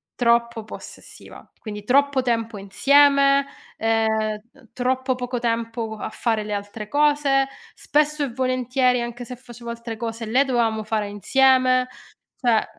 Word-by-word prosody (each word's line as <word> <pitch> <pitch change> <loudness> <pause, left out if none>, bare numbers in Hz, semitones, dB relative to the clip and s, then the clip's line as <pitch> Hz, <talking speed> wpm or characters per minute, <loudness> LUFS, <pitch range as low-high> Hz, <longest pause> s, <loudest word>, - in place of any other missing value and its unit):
troppo 235 -1 +1
possessiva. 215 - -11
Quindi 210 -2 -7
troppo 275 +3 +3
tempo 230 -3 -1
insieme, 280 +6 +4 0.3
ehm, 225 0 +1 0.5
ehm, 235 - -21
troppo 260 +1 -1
poco 250 0 -4
tempo 230 -1 -2
co 220 - -6
a - - -5
fare 225 -2 -1
le 210 0 -5
altre 205 +1 -5
cose. 285 -1 +2 0.3
Spesso 300 0 0
e 280 - -2
volentieri, 255 0 +1
anche 240 +1 -6
se 250 - -7
facevo 240 -1 -10
altre 235 -1 -7
cose, 225 0 -5
le 255 +6 +2
dovevamo 230 -4 0
fare 215 -1 -2
insieme. 255 +4 +3 0.5
Cioè 245 -2 +2
ehm, 220 - +3
240 Hz, 145 wpm, -22 LUFS, 225-265 Hz, 0.5 s, insieme